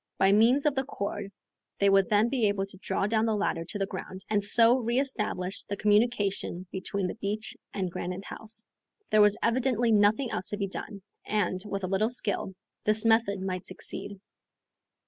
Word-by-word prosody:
By 190 Hz, 0 st, +4 dB
means 235 Hz, +8 st, +4 dB
of 300 Hz, -, +3 dB
the 265 Hz, -1 st, 0 dB
cord 200 Hz, -5 st, -5 dB, 0.5 s
they 200 Hz, -, +3 dB
would 195 Hz, -1 st, +4 dB
then 210 Hz, +2 st, +4 dB
be 240 Hz, -3 st, +1 dB
able 200 Hz, -1 st, 0 dB
to 195 Hz, -1 st, -12 dB
draw 195 Hz, -, -1 dB
down 220 Hz, +1 st, +1 dB
the 220 Hz, -, +1 dB
ladder 200 Hz, -5 st, -1 dB
to 205 Hz, -, -5 dB
the 195 Hz, -, 0 dB
ground, 190 Hz, 0 st, -8 dB
and 205 Hz, -1 st, +2 dB
so 230 Hz, +4 st, +5 dB
re 240 Hz, +1 st, 0 dB
establish 210 Hz, -8 st, -2 dB
the 200 Hz, -, -4 dB
communication 205 Hz, -4 st, +1 dB
between 190 Hz, +1 st, -3 dB
the 180 Hz, -, -2 dB
beach 215 Hz, 0 st, -4 dB, 0.2 s
and 185 Hz, -3 st, -3 dB
Granite 180 Hz, +3 st, -5 dB
House. 220 Hz, 0 st, -7 dB, 0.5 s
There 215 Hz, -, +6 dB
was 210 Hz, 0 st, +5 dB
evidently 240 Hz, -1 st, +2 dB
nothing 215 Hz, +4 st, +3 dB
else 180 Hz, -, -2 dB
to 205 Hz, -, -3 dB
be 200 Hz, -, -1 dB
done, 195 Hz, +1 st, -6 dB, 0.2 s
and, 185 Hz, -3 st, -1 dB
with 195 Hz, -1 st, -4 dB
a -, -, 0 dB
little 195 Hz, +4 st, +1 dB
skill, 205 Hz, -5 st, -1 dB, 0.3 s
this 215 Hz, +1 st, +2 dB
method 225 Hz, -3 st, +3 dB
might 185 Hz, -1 st, -4 dB
succeed. 200 Hz, +1 st, -5 dB
205 Hz, 185 wpm, -28 LUFS, 195-225 Hz, 0.5 s, There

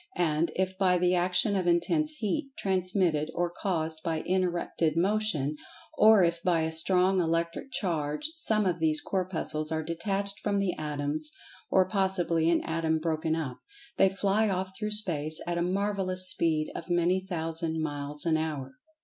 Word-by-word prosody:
And, 165 Hz, -1 st, +1 dB
if 190 Hz, 0 st, -2 dB
by 185 Hz, -2 st, +3 dB
the 180 Hz, 0 st, +2 dB
action 180 Hz, +3 st, +1 dB
of 185 Hz, -2 st, -1 dB
intense 300 Hz, -, +2 dB
heat, 275 Hz, +2 st, -3 dB
transmitted, 185 Hz, -5 st, 0 dB
or 175 Hz, 0 st, -1 dB
caused 160 Hz, -4 st, -2 dB
by 160 Hz, -2 st, -1 dB
interrupted 175 Hz, -3 st, -1 dB
Motion—or 210 Hz, -, +2 dB
if 170 Hz, 0 st, 0 dB
by 170 Hz, -2 st, +1 dB
a 160 Hz, 0 st, -1 dB
strong 185 Hz, +3 st, +3 dB
Electric 170 Hz, +8 st, -2 dB
charge—some 210 Hz, -, -1 dB
of 175 Hz, -2 st, 0 dB
these 155 Hz, -1 st, +3 dB
Corpuscles 170 Hz, -5 st, -2 dB
are 160 Hz, 0 st, -1 dB
detached 195 Hz, +5 st, -1 dB
from 205 Hz, -1 st, -1 dB
the 195 Hz, -3 st, 0 dB
Atoms 150 Hz, 0 st, -3 dB, 0.4 s
(or 185 Hz, -1 st, +3 dB
possibly 185 Hz, -4 st, +1 dB
an 170 Hz, -, +2 dB
Atom 160 Hz, 0 st, -1 dB
broken 160 Hz, 0 st, -1 dB
up), 145 Hz, -6 st, -5 dB, 0.4 s
they 195 Hz, -, +5 dB
fly 200 Hz, +2 st, +1 dB
off 190 Hz, 0 st, -2 dB
through 210 Hz, +1 st, -3 dB
Space 160 Hz, -8 st, +4 dB
at 175 Hz, 0 st, -2 dB
a -, -, 0 dB
marvellous 185 Hz, 0 st, +1 dB
speed 155 Hz, -3 st, 0 dB
of -, -, -8 dB
many 175 Hz, +2 st, +1 dB
thousand 165 Hz, -2 st, -2 dB
miles 145 Hz, -1 st, -3 dB
an 160 Hz, -1 st, +2 dB
hour. 145 Hz, -4 st, -5 dB
175 Hz, 155 wpm, -28 LUFS, 160-190 Hz, 0.4 s, they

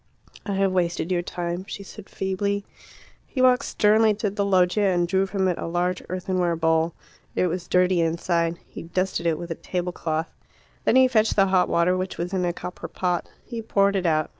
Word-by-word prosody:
"I 200 Hz, -, -1 dB
have 195 Hz, 0 st, +2 dB
wasted 175 Hz, -1 st, 0 dB
your 175 Hz, -1 st, +2 dB
time," 175 Hz, 0 st, -4 dB
she 200 Hz, -, -6 dB
said 200 Hz, +1 st, -12 dB
feebly. 200 Hz, +1 st, -2 dB, 0.6 s
He 265 Hz, -, -6 dB
walked 255 Hz, +1 st, +4 dB
sternly 215 Hz, +1 st, +3 dB
to 210 Hz, -1 st, -2 dB
the 200 Hz, 0 st, -1 dB
loggia 195 Hz, +1 st, +3 dB
and 175 Hz, -2 st, +1 dB
drew 190 Hz, +2 st, +1 dB
from 190 Hz, -1 st, 0 dB
it 180 Hz, -, -1 dB
a -, -, -4 dB
large 175 Hz, +1 st, -1 dB
earthenware 180 Hz, -1 st, 0 dB
bowl. 160 Hz, 0 st, +1 dB, 0.4 s
It -, -, +2 dB
was 180 Hz, 0 st, -3 dB
dirty 180 Hz, -1 st, +3 dB
inside; 170 Hz, 0 st, 0 dB
he -, -, -9 dB
dusted 185 Hz, 0 st, -1 dB
it 160 Hz, -2 st, +1 dB
with 175 Hz, +1 st, -7 dB
a -, -, +1 dB
tablecloth. 170 Hz, -2 st, -3 dB, 0.5 s
Then -, -, +3 dB
he 260 Hz, 0 st, +7 dB
fetched 225 Hz, -3 st, +2 dB
the 195 Hz, -, +5 dB
hot 185 Hz, -1 st, +3 dB
water, 170 Hz, +2 st, +3 dB
which 185 Hz, 0 st, -3 dB
was 175 Hz, +2 st, -4 dB
in 185 Hz, -1 st, 0 dB
a 175 Hz, -, +1 dB
copper 180 Hz, +1 st, -7 dB
pot. 180 Hz, -2 st, -2 dB, 0.2 s
He 235 Hz, -2 st, -5 dB
poured 200 Hz, -2 st, +2 dB
it 185 Hz, -2 st, +1 dB
out. 155 Hz, -1 st, +1 dB
185 Hz, 200 wpm, -24 LUFS, 170-200 Hz, 0.6 s, he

